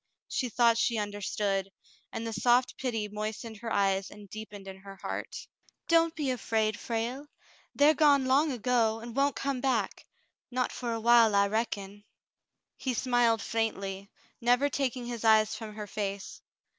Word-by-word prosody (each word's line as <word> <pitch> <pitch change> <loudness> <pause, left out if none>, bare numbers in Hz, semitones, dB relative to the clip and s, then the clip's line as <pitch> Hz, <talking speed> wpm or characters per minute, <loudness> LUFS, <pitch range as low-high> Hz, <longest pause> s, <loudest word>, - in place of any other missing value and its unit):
She 255 - -2
thought 235 -1 +3
she 235 - +1
understood, 205 -1 -2 0.4
and 225 - -4
the 225 - -3
soft 245 +3 +3
pity 225 -5 -2
moistened 215 +2 -5
her 225 +1 -6
eyes 195 -1 +1
and 205 0 -13
deepened 205 -1 -9
in 190 0 -8
her 195 0 -11
heart. - - -6 0.4
"Don't 330 0 +3
be 290 -4 -1
afraid, 220 -3 0
Frale; 240 +5 -3 0.5
they're 290 +2 +6
gone 285 -3 +4
long 280 +4 +3
ago, 230 -2 +1
and 235 +1 -9
won't 280 -1 +2
come 270 +1 -2
back 245 -7 -1 0.2
— - - -52
not 250 0 -1
for 240 -2 -4
a 230 - -2
while, 230 -2 +5
I 200 0 +5
reckon." 205 -2 -3 0.7
He 255 -2 -2
smiled 240 -2 +2
faintly, 200 -3 -2 0.3
never 245 +4 +3
taking 260 -3 -2
his 240 -2 -5
eyes 220 -1 +5
from 215 -1 -7
her 210 -1 -5
face. 200 -1 -5
225 Hz, 160 wpm, -29 LUFS, 210-250 Hz, 0.7 s, they're